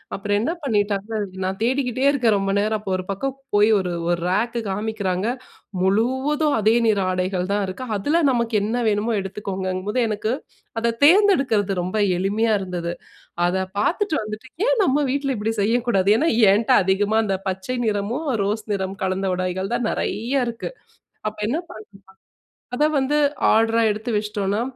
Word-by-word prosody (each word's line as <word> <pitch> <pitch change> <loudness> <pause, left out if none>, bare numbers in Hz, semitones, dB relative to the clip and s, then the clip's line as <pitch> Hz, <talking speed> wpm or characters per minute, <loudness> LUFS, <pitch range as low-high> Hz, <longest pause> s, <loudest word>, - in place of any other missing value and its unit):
அப்புறம் 205 +1 -1
என்ன 240 +10 0
பண்ணிட்டாங்கன்னா, 210 -3 -1 0.3
நான் 190 +2 -3
தேடிக்கிட்டே 255 +1 0
இருக்கேன் 240 -7 +2
ரொம்ப 195 0 -1
நேரம். 215 +1 +1
அப்போ 195 -2 -5
ஒரு 185 - -3
பக்கம் 270 +7 -3 0.2
போய் 205 +1 +5
ஒரு, 185 -2 -2 0.2
ஒரு 175 0 +1
ரேக்கு 230 +5 0
காமிக்கிறாங்க. 200 -1 -2 0.5
முழுவதும் 260 +10 +1
அதே 215 +2 +3
நிற 210 -2 +3
ஆடைகள் 185 0 -1
தான் 205 0 +1
இருக்கு. 185 +7 -6
அதுல 290 +12 +1
நமக்கு 235 -2 0
என்ன 220 +3 -1
வேணுமோ 210 +2 0
எடுத்துக்கோங்கங்கும்போது, 195 +2 -3
எனக்கு 215 +1 -2 0.5
அத 230 0 0
தேர்ந்தெடுக்கிறது 280 - +4
ரொம்ப 185 +5 -3 0.2
எளிமையா 215 +4 +1
இருந்தது. 175 -2 -4 0.5
அத 185 +2 0 0.2
பார்த்துட்டு 365 - +1
வந்துட்டு 215 +4 -8 0.2
ஏன் - - +3
நம்ம 295 -2 +2
வீட்ல 275 -2 -1
இப்பிடி 220 +2 -1
செய்யக்கூடாது? 225 -3 +1
ஏன்னா 320 +6 +2 0.2
ஏன்ட 220 +5 +2
அதிகமா 205 +3 +1
அந்த 195 -2 0
பச்சை 190 +7 -3
நிறமும், 215 +9 -2 0.2
ரோஸ் 210 +2 -2
நிறம் 190 0 -3
கலந்த 190 +1 -1
உடைகள் 185 +3 -2
தான் 240 -2 -1
நிறையா 250 +5 -1
இருக்கு. 230 - -6 0.6
அப்ப 215 - -9
என்ன 280 - 0
பண்ணுனேன்னா 215 -1 -11 0.8
...அத 295 - +2
வந்து 275 +3 +1 0.4
ஆர்டரா 225 +1 +3
எடுத்து 215 +3 -3
வச்சுட்டோன்னா, 210 0 -1
215 Hz, 150 wpm, -22 LUFS, 195-245 Hz, 0.8 s, போய்